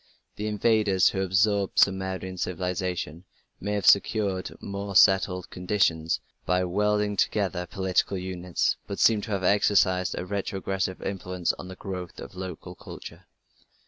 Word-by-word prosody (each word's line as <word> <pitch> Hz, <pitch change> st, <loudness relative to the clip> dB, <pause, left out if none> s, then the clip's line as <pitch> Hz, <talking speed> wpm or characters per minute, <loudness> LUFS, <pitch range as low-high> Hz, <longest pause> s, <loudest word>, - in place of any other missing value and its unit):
The 105 Hz, -, -4 dB
invaders 105 Hz, -3 st, +3 dB
who 95 Hz, -, -2 dB
absorbed 95 Hz, +1 st, +1 dB
Sumerian 95 Hz, -1 st, +1 dB
civilization 90 Hz, -1 st, -3 dB, 0.4 s
may 105 Hz, -, -3 dB
have 100 Hz, -1 st, -1 dB
secured 100 Hz, -2 st, +2 dB
more 100 Hz, 0 st, -5 dB
settled 95 Hz, -1 st, +4 dB
conditions 90 Hz, -4 st, +1 dB, 0.2 s
by 90 Hz, 0 st, +1 dB
welding 105 Hz, +3 st, +1 dB
together 95 Hz, -3 st, 0 dB
political 95 Hz, +2 st, 0 dB
units, 90 Hz, -1 st, -1 dB
but 100 Hz, -, -5 dB
seem 110 Hz, -2 st, +4 dB
to 110 Hz, -, -7 dB
have 100 Hz, -2 st, -1 dB
exercised 95 Hz, -2 st, +3 dB
a 90 Hz, -, -3 dB
retrogressive 95 Hz, -1 st, -3 dB
influence 90 Hz, -2 st, -2 dB
on -, -, -9 dB
the 95 Hz, -, -8 dB
growth 90 Hz, -2 st, -7 dB
of -, -, -9 dB
local 90 Hz, -1 st, -7 dB
culture. -, -, -11 dB
95 Hz, 135 wpm, -26 LUFS, 90-100 Hz, 0.4 s, settled